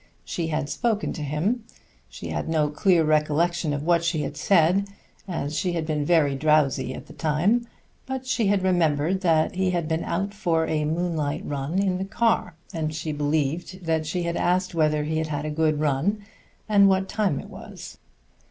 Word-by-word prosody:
She 170 -2 -3
had 155 -2 -1
spoken 220 +5 -1
to 155 - -6
him. 160 - -1 0.5
She - - -8
had - - -3
no 155 -2 +2
clear 170 +2 +3
recollection 155 +2 +1
of 145 0 -2
what 170 -1 +3
she 170 -3 0
had 145 - -5
said, 180 +4 +3 0.4
as 155 -5 -3
she 180 +2 0
had 165 -2 -2
been 155 -2 -1
very 155 -4 +3
drowsy 150 -3 +2
at - - -9
the - - -13
time; 185 +11 +1 0.4
but 265 0 -4
she 240 -4 +1
had 200 -1 +2
remembered 175 -1 +2
that 160 -4 +2
he 190 0 0
had 175 -3 -1
been 160 0 -1
out 195 +4 -2
for 170 -6 0
a 155 -1 0
moonlight 160 -2 -1
run 145 +4 -3
in 190 -2 +1
the 190 - -2
car, 220 -4 0 0.2
and 155 -1 -2
she 155 +1 -3
believed 150 +4 -1 0.3
she 180 +2 -2
had 170 0 -2
asked 185 +1 +1
whether 155 -2 +2
he 155 +1 -1
had 160 - -1
had 150 -1 -3
a 155 - -2
good 155 -1 +1
run, 155 +9 0 0.4
and 200 -2 +6
what 190 0 +2
time 195 -10 0
it - - -10
was. - - -10
165 Hz, 190 wpm, -25 LUFS, 150-185 Hz, 0.5 s, and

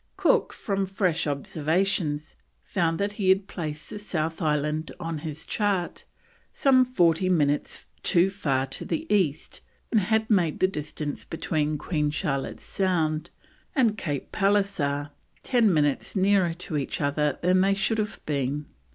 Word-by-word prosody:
Cook, - - +3
from 195 -3 -2
fresh 185 -5 0
observations, 155 +2 -1 0.3
found 165 -4 0
that 200 +1 0
he 200 -2 -1
had 190 +1 +4
placed 155 -5 -6
the 210 - -5
South 165 -4 -3
Island 150 0 0
on 165 -2 -3
his 155 0 -6
chart 200 -5 -1 0.5
some 260 -2 +4
40 180 -7 +2
minutes 150 -5 +1 0.2
too 180 +2 +3
far 135 -9 0
to 135 - -5
the 315 - -2
east, 160 -7 0 0.3
and 225 - +4
had 220 +3 +1
made 180 -8 +2
the 185 - +4
distance 150 -3 -5
between 155 -2 -1
Queen 150 -1 -1
Charlotte's 145 -3 -3
Sound 165 -4 0 0.5
and 235 -6 +3
Cape 145 -9 -4
Pallisser 195 -8 +1 0.3
10 235 -5 +3
minutes 145 0 +1
nearer 190 -3 +3
to 175 -3 -4
each 140 - -2
other 145 0 0
than 185 +1 +4
they 195 +1 +3
should 220 +2 0
have 210 0 -2
been. 145 0 -1
170 Hz, 145 wpm, -26 LUFS, 150-195 Hz, 0.5 s, had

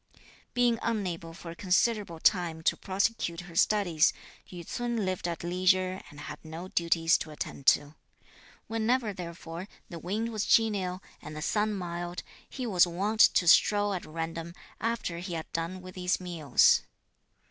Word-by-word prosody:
Being 240 -2 +3
unable 180 -7 -2
for 165 0 -9
a - - -9
considerable 190 -1 +1
time 170 -3 +2
to - - +3
prosecute 190 -3 -1
her 175 -2 -12
studies, 175 -4 +3 0.4
Yü 175 -2 -9
ts'un 240 -4 -2
lived 185 -2 -2
at 170 -1 -4
leisure 185 +1 +1
and 145 0 -11
had - - -8
no 165 +3 -8
duties 165 -1 +2
to - - -6
attend 145 -2 -7
to. 145 +1 +4 0.7
Whenever 225 0 0
therefore 170 0 -7 0.2
the 170 - -7
wind 215 +7 -2
was 215 -2 -2
genial 195 -5 +2 0.2
and 150 - -8
the 155 - -5
sun 210 +2 +1
mild, 175 -1 -5 0.3
he 255 - -5
was 185 -6 +4
wont 200 +6 -2
to 180 - +6
stroll 205 +3 +5
at 180 - -3
random, 165 +1 -5 0.2
after 225 -7 -2
he 175 -1 -5
had 160 - -6
done 170 +3 -3
with 185 0 -9
his 180 0 0
meals. 165 -8 +3
180 Hz, 160 wpm, -29 LUFS, 170-205 Hz, 0.7 s, to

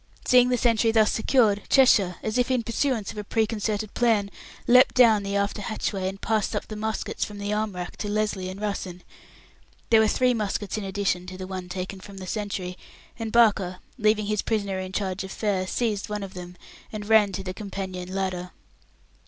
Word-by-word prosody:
Seeing 250 0 +5
the 250 - +2
sentry 230 -1 +3
thus 220 -1 +4
secured, 220 -3 +2
Cheshire, 205 -9 +5
as 220 +3 -1
if 245 - +1
in 255 -2 +1
pursuance 230 -2 -1
of 210 - -7
a - - -4
preconcerted 215 -1 -1
plan, 220 -4 +2 0.3
leapt 250 +2 +6
down 230 -5 +6
the 200 0 -3
after 200 +1 -1
hatchway, 200 -2 -2
and 195 +1 -5
passed 220 -1 0
up - - -2
the 215 - -7
muskets 220 +1 -3
from 210 - -6
the 205 +1 -2
arm 210 -1 -1
racks 180 0 -6
to 210 - -4
Lesly 205 -3 -1
and 190 +1 -8
Russen. 195 -4 -4 0.9
There 225 - +7
were 220 - +4
three 250 +3 +2
muskets 210 -3 -2
in 215 - -3
addition 195 -2 -1
to 185 0 -8
the 185 - -6
one 185 -1 -6
taken 185 +1 -5
from 195 +1 -12
the 190 - -7
sentry, 190 -3 -4 0.4
and 225 -1 -3
Barker, 205 -6 +3 0.2
leaving 215 -1 +2
his 210 0 0
prisoner 200 -4 -1
in 185 0 -5
charge 190 -1 -2
of 190 - -7
Fair, 195 -4 -1
seized 210 -2 -1
one 210 -1 -3
of 195 - -8
them, 180 0 -9 0.3
and 210 -1 -6
ran 215 -2 +5
to 195 - -4
the 185 -1 -5
companion 185 -2 -6
ladder. 185 -2 -2
205 Hz, 200 wpm, -25 LUFS, 190-220 Hz, 0.9 s, There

